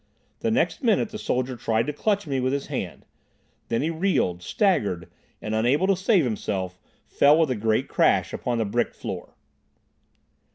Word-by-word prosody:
The 230 - 0
next 250 +7 +1
minute 225 -2 +2
the 215 -1 -7
soldier 130 -5 -1
tried 115 -1 0
to 150 - -3
clutch 205 +5 0
me 135 -3 -1
with 130 +1 0
his 140 -1 -2
hand. - - -4 0.6
Then 115 +3 0
he 160 - 0
reeled, 160 - 0
staggered, 100 - 0 0.4
and, 110 - -3
unable 125 +10 +2
to 195 0 +3
save 190 -1 +3
himself, 95 -6 -3 0.3
fell 145 +2 +4
with 160 -5 +2
a - - 0
great 110 0 0
crash - - +2
upon 120 -1 -2
the 115 - 0
brick 100 - -1
floor. - - -7
130 Hz, 170 wpm, -25 LUFS, -, 0.6 s, fell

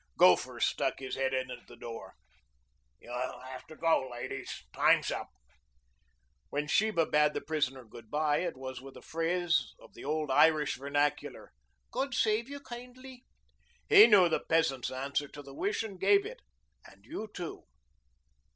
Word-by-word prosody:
Gopher - - +4
stuck - - 0
his 130 -1 -7
head 135 0 0
in 130 -1 -2
at 125 -1 -10
the - - -13
door. 115 -1 -9 0.8
"You'll 125 +1 -5
have 130 0 -9
to 155 - -11
go, 160 -6 +1
ladies. 120 0 -6
Time's - - +3
up." - - -4 1.2
When 145 +1 -2
Sheba 185 0 +2
bade 150 0 +2
the - - -2
prisoner 135 -5 -2
good 110 0 -13
bye 150 0 +1
it 180 - -3
was 130 -1 -7
with 135 0 -11
a - - -13
phrase 170 +1 0
of - - -18
the - - -11
old 150 0 -1
Irish 150 +1 +4
vernacular. 145 +2 -2 0.4
"God 270 -2 -2
save 220 +3 +1
you 285 0 -7
kindly." 250 +1 -11 0.6
He 215 - +10
knew 200 -6 +7
the 160 - +1
peasant's 150 -6 +1
answer 140 +2 -2
to 145 +1 -11
the 135 -1 -12
wish 205 +9 -1
and 200 -4 -8
gave 400 -1 +4
it. - - -8 0.4
"And - - -18
you 220 -9 -6
too." 175 -5 -7
150 Hz, 160 wpm, -31 LUFS, 135-205 Hz, 1.2 s, He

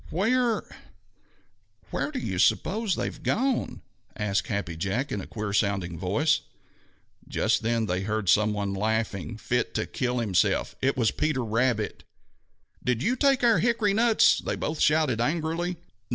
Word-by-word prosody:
"Where 230 +6 +1 1.3
where - - -1
do 295 - -5
you 250 - -3
suppose 215 0 +2
they - - -2
have - - -6
gone?" 255 +1 -1 0.3
asked 100 -4 -1
Happy 100 -5 -3
Jack 100 - -2
in 100 - -2
a - - -9
queer 105 -2 -4
sounding 100 -4 0
voice. 145 - +1 0.9
Just - - +1
then 115 0 0
they 95 -2 -1
heard 110 0 -2
some 105 +4 +4
one 100 -1 -2
laughing 105 -3 -2
fit 125 +2 -1
to - - 0
kill 125 -1 -2
himself. 105 -7 +1
It 135 0 +1
was 115 -4 +2
Peter 150 -5 -1
Rabbit. 115 -1 0 0.8
"Did 125 0 0
you 250 - +2
take 270 -1 +2
our 235 -2 +5
hickory 225 -4 +2
nuts?" 225 +1 +4
they - - -3
both 155 0 -3
shouted 150 -7 +2
angrily. 165 +5 -1
120 Hz, 150 wpm, -26 LUFS, -, 1.3 s, our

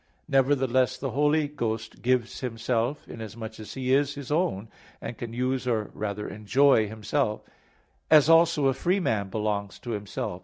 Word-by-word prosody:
Nevertheless, 130 -2 +2
the 135 -2 -4
Holy 150 +3 +2
Ghost 115 -6 -4
gives 125 -1 0
Himself, 120 +2 -2
inasmuch 110 0 -8
as 110 - -9
He 130 -1 0
is 140 +1 +2
His 140 -1 -7
own, 150 - 0 0.3
and - - -6
can 115 0 -6
use 125 +2 -1
or 110 -4 -1
rather 105 0 -4
enjoy 110 +3 +3
Himself; 110 +2 -2 0.7
as 155 -2 +7
also 165 -2 +5
a 135 - +4
free 180 +8 +1
man 105 - -1
belongs 105 -1 -2
to 120 - -7
himself. 100 -2 -4
125 Hz, 155 wpm, -27 LUFS, 110-140 Hz, 0.7 s, as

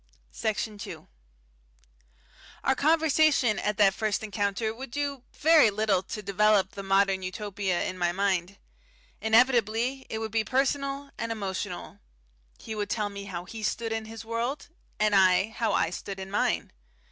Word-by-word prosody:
Section 215 - -2
2 - - -8 1.6
Our 265 - +3
conversation 305 -6 +3
at 210 -1 -1
that 195 -2 +5
first 215 0 -1
encounter 205 +1 -1
would 265 +4 -8
do 280 0 -3
very 310 -6 +5
little 205 -2 +1
to 210 +2 -7
develop 200 -1 +3
the 200 - -7
Modern 195 0 +2
Utopia 190 -1 -2
in 185 - -4
my 175 -1 +2
mind. 195 0 -1 0.6
Inevitably, 235 +2 +2
it 220 - -3
would 220 -1 -4
be 220 0 +1
personal 275 +3 -1
and 230 - -2
emotional. 200 -4 -5 0.6
He 220 - -7
would 210 -1 -3
tell 210 -2 -1
me 200 0 -8
how 180 -3 -6
he 220 +3 -8
stood 225 +2 -2
in 225 0 -3
his 225 0 -9
world, 235 +7 -3 0.3
and 215 0 +2
I 190 +1 +5
how 220 -1 -1
I 165 - +1
stood 195 +2 -6
in 190 0 -7
mine. 205 - 0
215 Hz, 155 wpm, -28 LUFS, 195-235 Hz, 1.6 s, that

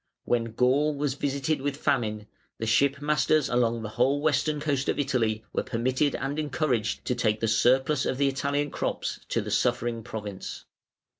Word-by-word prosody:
When 115 -2 0
Gaul 140 +5 +2
was 140 -1 -1
visited 140 +1 -1
with 145 0 -2
famine, 110 -8 0 0.3
the 115 - -3
ship 140 +5 +2
masters 150 0 +2
along 120 -2 +1
the 105 - -4
whole 130 +6 +2
western 150 0 +1
coast 145 -2 -1
of - - 0
Italy 115 -6 0
were - - +1
permitted 130 +4 0
and 140 +3 -3
encouraged 130 -7 -1
to - - +1
take 110 -3 0
the 115 - 0
surplus 130 +5 +3
of 130 - -1
the 140 0 +3
Italian 140 +1 -1
crops - - -3
to - - 0
the - - -6
suffering 120 -1 0
province. 105 -3 -7
130 Hz, 170 wpm, -27 LUFS, 115-145 Hz, 0.3 s, surplus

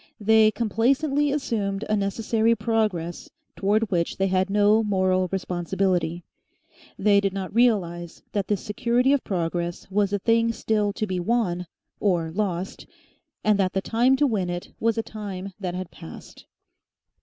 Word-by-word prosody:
They 220 +1 +5
complacently 270 +7 +1
assumed 215 -8 -2
a 215 - +1
necessary 220 +3 +1
progress 210 -7 -1 0.3
towards 210 +2 +1
which 170 -2 0
they 195 - +1
had 185 0 +1
no 210 +2 +4
moral 185 -2 +1
responsibility. 180 -2 -1 0.7
They 200 0 +4
did 195 -1 -1
not 195 -1 -5
realise 180 -8 +1
that 200 -2 -1
this 205 -3 0
security 245 +5 +1
of 285 - +1
progress 175 0 -3
was 200 0 +1
a 205 - +1
thing 230 +3 +2
still 210 -2 0
to 215 - -2
be 185 -3 -2
won 180 -3 0 0.3
or 175 -5 +1
lost, 190 -1 -3 0.6
and 210 -1 +3
that 185 -1 +1
the 195 - +1
time 240 +6 +3
to 290 - +2
win 205 -9 0
it 175 0 -5
was 230 0 +1
a 225 - 0
time 200 -3 -7
that 185 -2 -4
passed. 80 - -12
200 Hz, 150 wpm, -24 LUFS, 185-225 Hz, 0.7 s, They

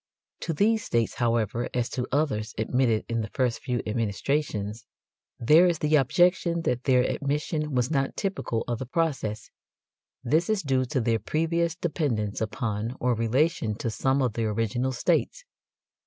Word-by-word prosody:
To 165 - -3
these 220 +7 +2
states, 115 -1 0
however, 115 -1 0
as 120 -1 +1
to 125 -1 -2
others 120 -7 0
admitted 115 0 +1
in 115 -1 -1
the 110 - -5
first 125 -3 +1
few 125 -3 -2
administrations, 110 0 -2 0.5
there 155 +9 +6
is 170 -2 +1
the 150 +1 +2
objection 170 +4 +3
that 125 -3 -1
their 130 -3 +4
admission 150 +2 -2
was 125 +3 +1
not 135 -3 0
typical 190 - -2
of 120 -1 -2
the 130 - -5
process. 130 -8 -2 0.7
This 155 - +1
is 215 -4 +1
due 130 -2 +1
to 130 +1 -1
their 115 0 +1
previous 165 - 0
dependence 135 - -2
upon 110 +1 -2
or 125 0 +2
relation 115 0 +1
to 115 +1 -3
some 135 +4 +1
of 125 -4 0
the 115 0 -1
original 115 +4 -1
states. - - 0
125 Hz, 155 wpm, -26 LUFS, 115-155 Hz, 0.7 s, there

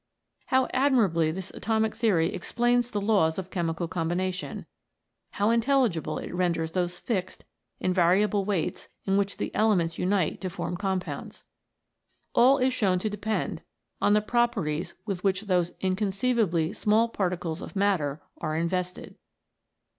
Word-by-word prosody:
How 260 0 +3
admirably 225 - +3
this 185 +3 -5
atomic 220 0 0
theory 190 -8 +2
explains 240 +5 +1
the 210 - -2
laws 200 -6 +2
of 185 -1 -5
chemical 170 -1 -2
combination; 180 +2 -2 0.7
how 205 +2 +2
intelligible 230 - +1
it - - -6
renders 170 -3 0
those 180 0 -1
fixed, 185 -5 -3 0.3
invariable 185 +3 +2
weights 190 -5 -2 0.2
in 195 - +1
which 200 0 0
the - - -4
elements 180 -7 +2
unite 185 -2 0
to 185 - -2
form 175 - -4
compounds. 190 -1 -4 0.9
All 260 +3 +6
is 260 -1 +2
shown 195 -7 +2
to 210 +4 -2
depend 210 +1 -2 0.4
on 205 - +4
the 210 - +4
properties 205 -9 0
with 195 -4 -4
which 195 -1 +1
those 180 -5 +1
inconceivably 190 -2 +1
small 220 +2 +3
particles 180 -5 -2
of - - -9
matter 175 -8 0 0.2
are 155 0 -2
in 165 +1 +1
vested. 180 0 -4
190 Hz, 140 wpm, -27 LUFS, 175-215 Hz, 0.9 s, All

